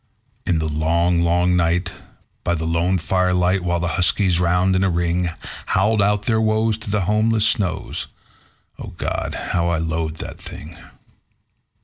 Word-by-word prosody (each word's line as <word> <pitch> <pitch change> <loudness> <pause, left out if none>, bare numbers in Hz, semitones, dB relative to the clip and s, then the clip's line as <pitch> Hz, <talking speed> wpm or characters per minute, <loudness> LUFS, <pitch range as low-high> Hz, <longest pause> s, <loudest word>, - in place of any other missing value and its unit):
In 85 - +2
the 80 0 -1
long, 85 +3 +1
long 90 +1 +2
night, 90 +1 +1 0.5
by 85 - 0
the 80 -1 -3
lone 85 +3 +1
firelight, 90 +2 +1
while 85 -1 0
the 85 - -1
huskies, 90 -1 +2
round 90 +2 +2
in 95 - +2
a 95 - +2
ring, 85 0 0 0.4
Howled 105 +3 +2
out 105 +1 +2
their 110 0 +1
woes 110 0 +1
to 110 - -7
the 105 0 0
homeless 110 +3 +2
snows 105 -6 -1 0.7
O - - -7
God! - - -3 0.2
how 85 0 +1
I 85 - +1
loathed 80 -1 -2
the - - -6
thing. 80 +4 -10
90 Hz, 155 wpm, -21 LUFS, 85-100 Hz, 0.7 s, In